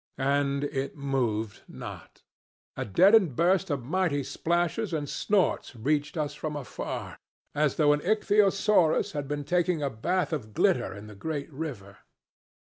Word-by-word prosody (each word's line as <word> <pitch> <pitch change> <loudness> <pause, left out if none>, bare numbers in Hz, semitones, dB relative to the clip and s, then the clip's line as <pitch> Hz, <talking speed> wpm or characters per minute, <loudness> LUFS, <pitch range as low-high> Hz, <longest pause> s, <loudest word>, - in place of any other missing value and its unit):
And 140 +1 +1
it 140 0 -3
moved 120 -7 -1
not. - - -10 0.5
A - - -3
deadened 185 - +5
burst 175 +3 +2
of 140 -4 -2
mighty 160 -2 0
splashes 170 - -1
and 150 -2 -2
snorts 185 -6 0
reached 145 +7 -1
us 150 -2 -1
from 150 +1 -5
afar, 145 -4 -6 0.3
as 150 -2 +1
though 145 -2 +4
an 145 - 0
ichthyosaurus 205 -3 +3
had 145 -3 -4
been 145 0 -3
taking 175 0 +1
a 140 - -1
bath 175 +11 -1
of 110 -8 -5
glitter - - +2
in 100 +1 -9
the 105 - -10
great 145 +6 -5
river. 120 -10 -6
145 Hz, 145 wpm, -28 LUFS, 135-175 Hz, 0.5 s, deadened